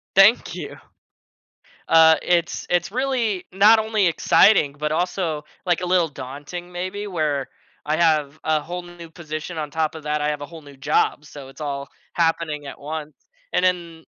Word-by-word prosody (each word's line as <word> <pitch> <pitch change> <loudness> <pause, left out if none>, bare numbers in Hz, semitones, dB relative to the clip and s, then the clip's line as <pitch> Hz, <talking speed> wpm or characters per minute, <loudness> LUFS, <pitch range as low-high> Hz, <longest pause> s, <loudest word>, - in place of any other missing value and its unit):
Thank 195 +5 +5
you. - - -7 1.1
Uh, 160 0 +7
it's 170 -1 0
it's 175 +1 +1
really 235 -7 -1
not 210 +4 +6
only 215 -3 +1
exciting, 165 -1 +4
but 150 +1 -2
also, 170 -2 -1 0.2
like 175 -1 +1
a - - -2
little 180 -2 +3
daunting, 145 +6 -8
maybe, 185 +4 -4
where 150 -7 -1 0.4
I 150 +1 +1
have 155 -3 +2
a 155 -1 +1
whole 180 +4 -5
new 175 -1 -11
position 160 0 -7
on 150 -2 -4
top 160 0 -1
of 160 - -9
that, 150 0 -1
I 150 - +1
have 150 -1 -3
a - - -4
whole 165 +2 -12
new 145 -1 -14
job. 145 +1 0
So 145 -2 -11
it's 135 +3 -13
all 140 -2 -4 0.3
happening 165 -3 0
at - - -9
once. 150 +1 -6 0.4
And - - +2
then, 170 -3 -1
160 Hz, 175 wpm, -22 LUFS, 150-180 Hz, 1.1 s, Uh